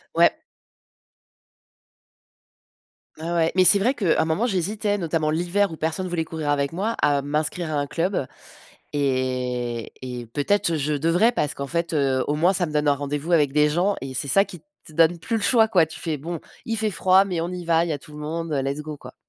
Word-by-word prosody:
Ouais. - - +5 2.8
Ouais, 165 +2 -5
ouais, 165 -1 +2
mais 185 - +5
c'est 200 +2 +7
vrai 240 +7 +2
que, 200 - +1
un - - +3
moment 160 +9 0
j'hésitais, 205 0 -1
notamment 165 -4 -1
l'hiver 175 +5 +1
où 160 - -7
personne 160 +4 -2
voulait 170 -2 -1
courir 160 -2 -4
avec 140 0 0
moi, 210 +6 -2
à 145 -1 +3
m'inscrire 155 +3 -2
à - - -1
un 145 - -2
club 170 -3 -1 0.7
et 125 -4 -1
et 125 -2 -6
peut-être 165 - 0
je 150 0 -1
devrais 165 - +2
parce 150 - -1
qu'en 140 - -5
fait, 170 +3 -2
heu, 135 -3 +1
au 145 - 0
moins 170 +5 +3
ça 180 -2 0
me 155 - -7
donne 150 0 0
un 145 - +4
rendez-vous 145 +4 -4
avec 145 -4 +3
des 150 0 +4
gens 180 +6 +1
et 135 -1 -5
c'est 130 +2 -3
ça 195 +9 +4
qui 180 - -11 0.3
te - - -11
donne 165 +2 +3
plus 225 +7 -2
le 220 - -2
choix 225 +1 +4
quoi, 180 -7 +4
tu 160 - -10
fais 160 -3 -3
bon: 165 +4 -5 0.3
«Il 225 - -1
fait 215 0 0
froid 190 0 +4
mais 180 -4 -2
on 170 - -2
y 180 -1 -6
va, 165 0 +2
il - - -4
y - - -1
a - - -5
tout 150 - -15
le 150 - -10
monde, 160 +2 -4
heu, 140 - +1
let's 140 +2 -3
go 150 -1 -7
quoi». 125 -1 -12
160 Hz, 225 wpm, -23 LUFS, 145-180 Hz, 2.8 s, c'est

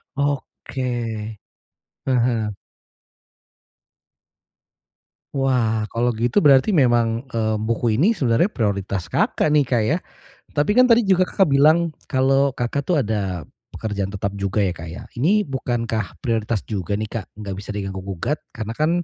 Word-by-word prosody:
Oke. 120 -6 -3 0.7
Heeh. 120 -4 +1 2.8
Wah. 120 -6 +1
Kalau 120 +1 +1
gitu 120 - +1
berarti 140 +8 +5
memang, 120 -4 +3
eee, 110 -1 0
buku 115 0 0
ini 175 - +4
sebenarnya 145 - +2
prioritas 100 - -2
Kakak 85 - +1
nih, 150 - +5
Kak, 120 -3 +1
ya. 155 +9 +2 0.6
Tapi 145 +5 +1
kan 255 - +8
tadi 235 -1 +5
juga 185 -2 +3
Kakak 190 -2 +2
bilang 155 +4 +4 0.2
kalau 135 +1 +2
Kakak 130 +3 -2
tuh 160 -7 +2
ada 100 -6 -2 0.3
pekerjaan 100 -3 -3
tetap 100 0 -2
juga 100 +1 0
ya, 95 - +2
Kak, 85 0 -8
ya, 85 - -8 0.2
Ini 200 +10 +3
bukankah 115 -8 -2
prioritas 115 -3 -1
juga 100 -3 -3
nih, 110 +1 -3
Kak? 115 -4 -4
Nggak 100 -2 -5
bisa 105 0 -6
diganggu 95 -1 -4
gugat 100 - -2 0.2
karena 110 -2 -4
kan 155 +2 +2
115 Hz, 140 wpm, -22 LUFS, 105-140 Hz, 2.8 s, kan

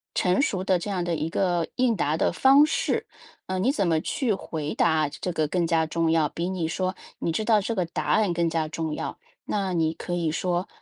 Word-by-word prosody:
成 180 +6 +2
熟 195 - 0
的 190 -2 +2
这 190 - -5
样 185 -3 -1
的 175 -1 -1
一 160 +1 -2
个 175 -2 0
应 250 -3 +2
答 155 -4 0
的 - - +2
方 275 +2 +6
式。 310 - -1 0.4
呃， 185 0 -2
你 235 +8 +2
怎 200 - 0
么 160 -1 +2
去 240 - 0
回 155 -5 -4
答 160 -3 +2
这 150 +5 -4
个 155 -3 0
更 170 +2 0
加 165 -1 +2
重 165 +1 0
要， 160 -2 +3
比 170 +5 -3
你 180 -4 -2
说 185 +3 -2 0.2
你 170 - -1
知 215 +7 -2
道 215 -2 +4
这 225 +4 -2
个 185 -3 0
答 165 - -4
案 210 -5 +2
更 170 0 +1
加 160 -1 -1
重 160 -1 -3
要。 - - -5 0.3
那 195 -3 -1
你 160 -2 +1
可 175 - -6
以 170 -2 0
说： 180 +2 -1
175 Hz, 250 characters per minute, -25 LUFS, 160-195 Hz, 0.4 s, 方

